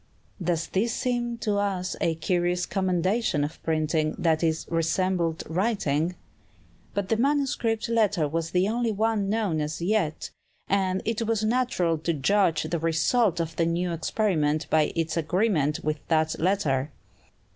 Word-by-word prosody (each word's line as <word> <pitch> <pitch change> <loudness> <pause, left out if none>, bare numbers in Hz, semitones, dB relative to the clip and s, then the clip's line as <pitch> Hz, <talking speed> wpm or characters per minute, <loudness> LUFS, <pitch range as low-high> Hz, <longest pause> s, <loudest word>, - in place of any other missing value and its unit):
Does 170 -1 0
this 220 +4 0
seem 240 -1 -1
to 210 -2 +1
us 190 -3 -1
a 165 -3 +1
curious 175 +2 0
commendation 185 -2 0
of 150 +2 -5
printing, 155 -1 0
that 160 -2 +1
it 160 -1 0
resembled 165 0 0
writing? 175 -3 0 0.8
But 200 -1 -2
the 225 - +2
manuscript 260 -4 0
letter 210 -8 +2
was 165 +2 -2
the 180 +2 +2
only 230 +1 0
one 215 -1 0
known 205 -8 0
as 150 +1 -3
yet, 175 -3 -1 0.4
and 190 -1 0
it 225 0 -1
was 225 -1 0
natural 215 -9 +1
to 165 +2 -1
judge 165 +2 +2
the 160 +2 -2
result 170 +4 +2
of 165 -1 -3
the 165 - +2
new 175 +1 0
experiment 160 -3 0
by 155 -1 +3
its 165 0 -1
agreement 165 -3 +1
with 155 0 -1
that 160 -1 +1
letter. 155 -6 +1
180 Hz, 145 wpm, -26 LUFS, 160-210 Hz, 0.8 s, by